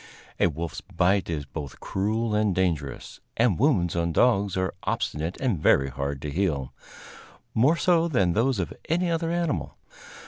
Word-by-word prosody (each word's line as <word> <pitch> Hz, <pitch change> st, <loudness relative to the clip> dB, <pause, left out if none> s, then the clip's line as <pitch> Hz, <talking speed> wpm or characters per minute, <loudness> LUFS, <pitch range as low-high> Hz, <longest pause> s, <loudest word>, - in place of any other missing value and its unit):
A -, -, +5 dB
wolf's 85 Hz, +1 st, -5 dB
bite 90 Hz, +3 st, +1 dB
is 75 Hz, -4 st, -3 dB
both 70 Hz, +1 st, -7 dB
cruel 110 Hz, +3 st, -1 dB
and 105 Hz, -3 st, +2 dB
dangerous, 80 Hz, -7 st, -2 dB, 0.2 s
and 115 Hz, -7 st, +2 dB
wounds 105 Hz, -, +2 dB
on 85 Hz, 0 st, 0 dB
dogs 100 Hz, -2 st, +2 dB
are 95 Hz, -1 st, -1 dB
obstinate 80 Hz, +4 st, -2 dB
and 120 Hz, -, 0 dB
very 70 Hz, -2 st, +4 dB
hard 70 Hz, +1 st, -4 dB
to 75 Hz, -, -3 dB
heal 75 Hz, -6 st, -1 dB, 0.8 s
more 135 Hz, +9 st, +4 dB
so 170 Hz, -2 st, +3 dB
than 95 Hz, -, +2 dB
those 120 Hz, +4 st, +2 dB
of 95 Hz, -, -3 dB, 0.2 s
any 175 Hz, +2 st, +1 dB
other 165 Hz, 0 st, 0 dB
animal. 170 Hz, -3 st, -2 dB
95 Hz, 160 wpm, -26 LUFS, 80-125 Hz, 0.8 s, A